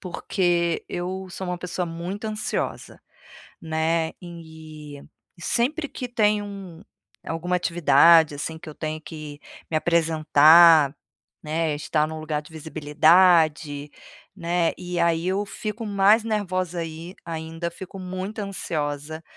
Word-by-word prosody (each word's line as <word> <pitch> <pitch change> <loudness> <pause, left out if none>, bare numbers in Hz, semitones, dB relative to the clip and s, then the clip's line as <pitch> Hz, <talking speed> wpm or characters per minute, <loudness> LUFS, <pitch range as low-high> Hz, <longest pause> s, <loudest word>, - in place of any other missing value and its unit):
porque 175 -2 -1
eu 185 +2 -4
sou 190 +1 -6
uma 180 - -3
pessoa 180 0 -3
muito 175 +6 -6
ansiosa, 215 0 -4 0.6
né, 160 0 0
e 160 -4 -11 0.4
e - - -16
sempre 285 - 0
que 250 - -6
tem, 210 -3 +2
hum, 195 -5 -9 0.5
alguma 175 +2 -1
atividade 165 -2 +5
assim 160 +3 -5
que 160 0 -11
eu - - -9
tenho 155 0 -5
que 155 -2 -9 0.3
me 160 - -2
apresentar, 160 -1 +5 0.5
né, 155 0 -1
estar 150 +1 0
em - - -6
um 160 - -6
lugar 155 -1 -3
de 150 - -17
visibilidade, 155 -1 +2 0.4
né, 175 -2 0
e 180 0 -5
aí 170 +1 +1
eu 195 +2 0
fico 215 +2 -5
mais 205 +2 +4
nervosa, 185 -5 -2
aí 165 +2 -7
ainda, 165 +1 -5
fico 190 +3 -10
muito 185 +3 -5
ansiosa, 155 -6 -4
170 Hz, 130 wpm, -24 LUFS, 155-185 Hz, 0.6 s, atividade